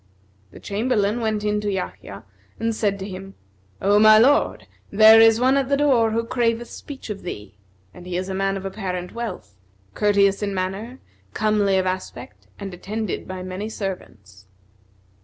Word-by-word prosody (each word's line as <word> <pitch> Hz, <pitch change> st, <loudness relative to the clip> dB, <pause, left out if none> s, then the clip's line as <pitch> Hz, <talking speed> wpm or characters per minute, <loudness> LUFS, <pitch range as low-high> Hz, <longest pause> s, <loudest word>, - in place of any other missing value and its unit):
The -, -, -14 dB
Chamberlain 215 Hz, +1 st, -1 dB
went 215 Hz, -2 st, -1 dB
in 210 Hz, 0 st, 0 dB
to 205 Hz, -1 st, -2 dB
Yahya 100 Hz, -, -6 dB, 0.4 s
and 225 Hz, 0 st, -1 dB
said 205 Hz, -2 st, -1 dB
to 195 Hz, 0 st, -6 dB
him, 195 Hz, 0 st, -9 dB, 0.4 s
"O 205 Hz, +2 st, +3 dB
my 215 Hz, 0 st, +8 dB
lord, 270 Hz, +6 st, +3 dB, 0.2 s
there 220 Hz, +2 st, +7 dB
is 225 Hz, 0 st, +6 dB
one 260 Hz, +2 st, +3 dB
at 270 Hz, -1 st, 0 dB
the 280 Hz, -, +2 dB
door 260 Hz, -6 st, +3 dB
who 230 Hz, +1 st, -1 dB
craveth 235 Hz, 0 st, -1 dB
speech 275 Hz, -6 st, -8 dB
of 200 Hz, -, -6 dB
thee; 105 Hz, -, -8 dB, 0.4 s
and 180 Hz, -, -12 dB
he 180 Hz, -1 st, -3 dB
is 185 Hz, +1 st, -3 dB
a 190 Hz, -, -4 dB
man 195 Hz, +1 st, -1 dB
of 195 Hz, -, -8 dB
apparent 185 Hz, -3 st, -5 dB
wealth, 190 Hz, -, -6 dB, 0.4 s
courteous 200 Hz, -1 st, +2 dB
in 200 Hz, -1 st, -2 dB
manner, 195 Hz, +7 st, -4 dB, 0.4 s
comely 210 Hz, -2 st, +2 dB
of 185 Hz, -, +1 dB
aspect 185 Hz, 0 st, -6 dB
and 195 Hz, -2 st, -7 dB
attended 210 Hz, +3 st, -5 dB
by 185 Hz, -1 st, -6 dB
many 185 Hz, +4 st, -5 dB
servants." 100 Hz, -, -8 dB
205 Hz, 170 wpm, -22 LUFS, 185-225 Hz, 0.4 s, my